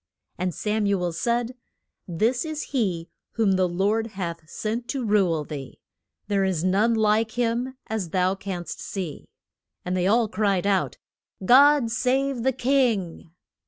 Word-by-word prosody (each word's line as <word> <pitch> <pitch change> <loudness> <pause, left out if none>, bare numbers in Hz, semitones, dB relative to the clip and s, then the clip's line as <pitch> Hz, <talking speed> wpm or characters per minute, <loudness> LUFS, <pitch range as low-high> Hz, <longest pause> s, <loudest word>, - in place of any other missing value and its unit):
And 180 0 0
Sam 210 +5 -1
u 200 -1 +1
el 175 - 0
said, 235 +7 -1 0.5
This 220 +8 0
is 310 -2 -4
he 185 -10 -1 0.2
whom 220 -4 +2
the 185 -1 +2
Lord 205 +6 0
hath 170 -4 -5
sent 230 +5 -3
to 270 -4 -3
rule 190 -7 +2
thee. 140 -3 -8 0.5
There 200 -2 +1
is 185 -4 0
none 205 +5 +3
like 220 0 +2
him, 245 +2 -1
as 210 -6 -3
thou 185 +2 +1
canst 190 -4 -6
see. 180 -7 -6 0.6
And 180 +1 -1
they 180 0 +1
all 225 +2 +3
cried 200 -2 0
out, 195 -2 +1 0.5
God 275 0 +6
save 255 +3 0
the 265 +3 +2
king! 240 -11 0
210 Hz, 150 wpm, -25 LUFS, 185-235 Hz, 0.6 s, God